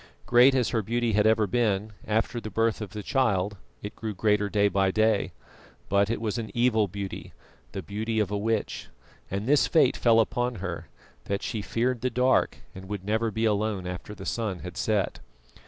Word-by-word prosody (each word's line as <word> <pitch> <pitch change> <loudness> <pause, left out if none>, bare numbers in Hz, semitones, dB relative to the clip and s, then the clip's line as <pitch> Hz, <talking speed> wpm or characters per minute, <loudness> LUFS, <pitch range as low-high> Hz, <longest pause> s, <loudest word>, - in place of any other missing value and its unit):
Great 125 +3 +6
as 125 -3 +2
her 115 - 0
beauty 120 +2 -1
had 105 +1 +4
ever 110 -1 +4
been, 105 -1 0
after 110 +2 0
the 110 - -6
birth 115 0 0
of 105 - -5
the 105 -1 -7
child 105 -6 +1 0.3
it 105 - -6
grew 110 -2 -5
greater 105 +1 +1
day 100 0 +3
by 95 -1 +2
day, 110 +1 +2 0.6
but 100 +1 +3
it 115 - -1
was 115 +1 -2
an 110 - -5
evil 120 -3 +3
beauty, 100 +1 -6 0.4
the - - -5
beauty 110 +2 -2
of 105 -2 0
a - - 0
witch; 110 +1 -2 0.4
and 100 +2 -3
this 140 0 +4
fate 155 -6 +4
fell 115 -1 +4
upon 120 +2 0
her, 90 -4 -5 0.4
that 100 0 -2
she 110 - -3
feared 120 +3 -1
the 130 - +1
dark 125 +2 +2 0.2
and 95 0 -10
would 100 -2 -5
never 110 +2 +1
be 110 +2 -1
alone 105 -3 0
after 90 +3 -6
the - - -9
sun 105 -6 -2
had 90 -1 -8
set. 105 -1 0
110 Hz, 195 wpm, -27 LUFS, 100-115 Hz, 0.6 s, Great